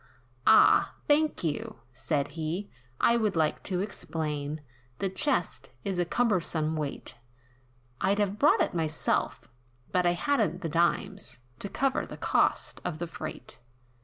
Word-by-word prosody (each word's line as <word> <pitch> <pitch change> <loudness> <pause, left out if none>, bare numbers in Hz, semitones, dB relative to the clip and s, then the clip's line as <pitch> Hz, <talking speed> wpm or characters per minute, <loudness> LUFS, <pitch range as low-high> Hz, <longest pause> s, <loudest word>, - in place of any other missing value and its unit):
"Ah! 220 - +6
thank 300 -4 +2
you," 155 -3 -2 0.2
said 140 +3 -1
he, 165 +5 -4 0.3
"I 235 - +4
would 215 -4 0
like 160 -2 +1
to 185 -2 -1
explain, 155 -6 -3 0.4
The 195 - -1
chest, 190 - +1
is 190 -2 -2
a 175 - +2
cumbersome 170 -7 +1
weight, 150 -3 -5 0.8
I'd 195 +2 +2
have 205 0 0
brought 295 - +5
it - - -3
myself; 150 -7 -1 0.4
but 180 -1 +2
I 175 - +4
hadn't 190 - 0
the 165 - -2
dimes, 165 -5 0 0.2
To 200 - -4
cover 270 +4 0
the - - -8
cost - - +1
of 175 -3 -3
the 175 - -3
freight. 155 -2 -6
175 Hz, 140 wpm, -29 LUFS, 155-205 Hz, 0.8 s, Ah